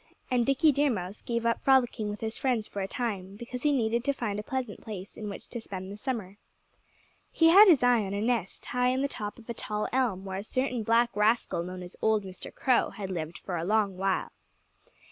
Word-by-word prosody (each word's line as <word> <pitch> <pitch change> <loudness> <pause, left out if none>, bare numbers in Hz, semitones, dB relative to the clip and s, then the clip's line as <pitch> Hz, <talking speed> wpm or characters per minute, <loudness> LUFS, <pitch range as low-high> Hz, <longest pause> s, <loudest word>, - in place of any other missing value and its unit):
And 245 -2 +2
Dickie 280 +3 +4
Deer 285 +1 +2
Mouse 195 -3 -3
gave 235 -1 -2
up 230 - +1
frolicking 250 -5 +3
with 205 - -6
his 220 0 -2
friends 245 -6 0
for 200 - -5
a 190 - -2
time, 195 -5 -3
because 240 +3 -7
he 295 - +3
needed 235 -3 +1
to 280 - +2
find 215 -6 -3
a - - -2
pleasant 250 -1 -4
place 200 -3 -8
in 210 -1 -6
which 200 - -8
to 235 - -5
spend 190 -3 -7
the - - -6
summer. 210 -4 -4 0.9
He 325 -1 +5
had 400 +5 +9
his 320 -9 +6
eye 245 -3 +4
on 195 0 -3
a - - -1
nest 225 -4 -1
high 250 0 +1
in 260 +2 +1
the - - +2
top 210 -6 -6
of 235 - -15
a 235 - -3
tall 210 -1 -3
elm, 230 -8 0
where 190 0 -4
a - - -6
certain 255 +1 -1
black 230 +2 +3
rascal 210 -3 +2
known 180 +1 -6
as 175 - -10
old 220 -1 +2
Mr. 190 -1 -8
Crow 255 -2 +2
had 195 -2 -6
lived 165 -1 -4
for 180 -3 -4
a 165 - -2
long 205 0 +1
while. 190 0 -1
220 Hz, 230 wpm, -29 LUFS, 195-250 Hz, 0.9 s, had